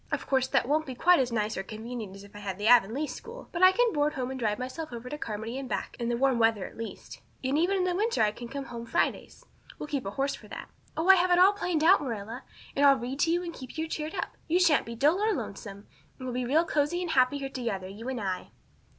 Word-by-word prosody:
Of -, -, -2 dB
course 260 Hz, -1 st, +1 dB
that 265 Hz, -3 st, +1 dB
won't 310 Hz, +2 st, +1 dB
be 260 Hz, -, -5 dB
quite 355 Hz, +6 st, +5 dB
as 250 Hz, -2 st, +1 dB
nice 215 Hz, -1 st, -1 dB
or -, -, -2 dB
convenient 220 Hz, 0 st, -7 dB
as 195 Hz, -, -11 dB
if 200 Hz, +1 st, -16 dB
I -, -, -8 dB
had 195 Hz, -3 st, -5 dB
the 205 Hz, -, -4 dB
Avonlea 240 Hz, +4 st, +5 dB
school. 465 Hz, +10 st, -9 dB
But 345 Hz, -, -3 dB
I 370 Hz, 0 st, +9 dB
can 475 Hz, +3 st, +2 dB
board 295 Hz, 0 st, +1 dB
home 260 Hz, -1 st, -3 dB
and 265 Hz, -, -5 dB
drive 210 Hz, -3 st, 0 dB
myself 260 Hz, +5 st, -5 dB
over 240 Hz, +1 st, -7 dB
to 295 Hz, -, -5 dB
Carmody 225 Hz, +3 st, -4 dB
and 265 Hz, -2 st, -7 dB
back, -, -, -3 dB
in 235 Hz, 0 st, -1 dB
the 240 Hz, -, 0 dB
warm 265 Hz, -1 st, +2 dB
weather 225 Hz, -4 st, +2 dB
at -, -, -10 dB
least. 225 Hz, 0 st, -8 dB, 0.2 s
And 260 Hz, +2 st, 0 dB
even 365 Hz, +4 st, +2 dB
in 355 Hz, 0 st, 0 dB
winter 435 Hz, -, +1 dB
I 210 Hz, -, +3 dB
can 240 Hz, +3 st, -9 dB
come 275 Hz, +2 st, -5 dB
home 235 Hz, -2 st, -7 dB
Fridays. -, -, -1 dB, 0.3 s
We'll -, -, -5 dB
keep 280 Hz, -8 st, -3 dB
a -, -, -1 dB
horse 275 Hz, +7 st, -1 dB
for -, -, -10 dB
that. -, -, -8 dB, 0.3 s
Oh, 320 Hz, +3 st, 0 dB
I 385 Hz, 0 st, +9 dB
have 360 Hz, +1 st, +2 dB
it 355 Hz, -, +5 dB
all 375 Hz, +3 st, +7 dB
planned 360 Hz, -6 st, -1 dB
out, 370 Hz, +2 st, +6 dB
Marilla. 230 Hz, -2 st, -5 dB, 0.3 s
And 280 Hz, -, +2 dB
I'll 280 Hz, -1 st, +7 dB
read 255 Hz, +3 st, -5 dB
to 330 Hz, -, +3 dB
you 350 Hz, +1 st, +1 dB
and 340 Hz, -1 st, -5 dB
keep 260 Hz, +1 st, -10 dB
you 320 Hz, +1 st, -1 dB
cheered 310 Hz, 0 st, -4 dB
up. -, -, -4 dB
You 345 Hz, +3 st, +3 dB
sha'n't 335 Hz, -9 st, +4 dB
be 230 Hz, -, -6 dB
dull 295 Hz, -, +3 dB
or 430 Hz, 0 st, +2 dB
lonesome. 200 Hz, -2 st, -7 dB, 0.3 s
And 255 Hz, -, -8 dB
we'll 250 Hz, -, -3 dB
be 250 Hz, 0 st, -1 dB
real 310 Hz, +7 st, +3 dB
cozy 315 Hz, +3 st, 0 dB
and 345 Hz, -, -3 dB
happy 255 Hz, +1 st, +3 dB
here 275 Hz, -1 st, -4 dB
together, 230 Hz, -8 st, -3 dB
you 215 Hz, +6 st, -7 dB
and 260 Hz, -2 st, -3 dB
I." 190 Hz, -3 st, -3 dB
265 Hz, 275 wpm, -28 LUFS, 230-320 Hz, 0.3 s, I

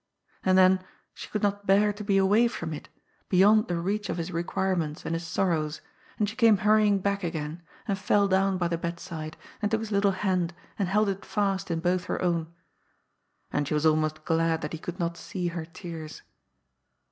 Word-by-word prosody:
And, 185 Hz, 0 st, +4 dB
then, 185 Hz, 0 st, +5 dB, 0.3 s
she -, -, -9 dB
could 210 Hz, -, -3 dB
not 205 Hz, 0 st, 0 dB
bear 205 Hz, +2 st, +4 dB
to 210 Hz, +1 st, -7 dB
be 200 Hz, -1 st, +2 dB
away 205 Hz, +5 st, +4 dB
from 170 Hz, -8 st, -5 dB
it, 150 Hz, -, -8 dB, 0.4 s
beyond 210 Hz, +4 st, +5 dB
the 175 Hz, -, -1 dB
reach 200 Hz, +3 st, -2 dB
of -, -, -2 dB
his 170 Hz, +1 st, -3 dB
requirements 170 Hz, -2 st, -1 dB
and 165 Hz, -, -2 dB
his 165 Hz, 0 st, -3 dB
sorrows, 160 Hz, -4 st, 0 dB, 0.4 s
and 210 Hz, -, +1 dB
she 220 Hz, -, -6 dB
came 230 Hz, -4 st, +5 dB
hurrying 210 Hz, -1 st, +5 dB
back 200 Hz, +1 st, -1 dB
again, 160 Hz, -1 st, -4 dB, 0.3 s
and 195 Hz, -2 st, -1 dB
fell 200 Hz, +1 st, +3 dB
down 190 Hz, 0 st, +2 dB
by 175 Hz, -1 st, 0 dB
the 170 Hz, -1 st, -2 dB
bed 170 Hz, 0 st, -4 dB
side, 155 Hz, -3 st, -7 dB, 0.2 s
and 210 Hz, -, +1 dB
took 220 Hz, 0 st, +1 dB
his 220 Hz, -1 st, -6 dB
little 200 Hz, -1 st, +3 dB
hand 185 Hz, -3 st, 0 dB, 0.2 s
and 195 Hz, -3 st, 0 dB
held 210 Hz, +2 st, +3 dB
it 195 Hz, 0 st, -2 dB
fast 195 Hz, -2 st, -1 dB
in 165 Hz, -1 st, -1 dB
both 180 Hz, +1 st, +1 dB
her -, -, -2 dB
own. 170 Hz, -2 st, 0 dB, 1.0 s
And 145 Hz, -1 st, 0 dB
she 150 Hz, -, 0 dB
was 150 Hz, +1 st, 0 dB
almost 155 Hz, 0 st, +1 dB
glad 165 Hz, 0 st, +1 dB
that 150 Hz, -, -4 dB
he 160 Hz, -, -4 dB
could 175 Hz, +2 st, -6 dB
not 170 Hz, 0 st, -1 dB
see 180 Hz, -2 st, -3 dB
her 170 Hz, -1 st, -5 dB
tears. 165 Hz, -1 st, -8 dB
185 Hz, 205 wpm, -27 LUFS, 165-200 Hz, 1.0 s, then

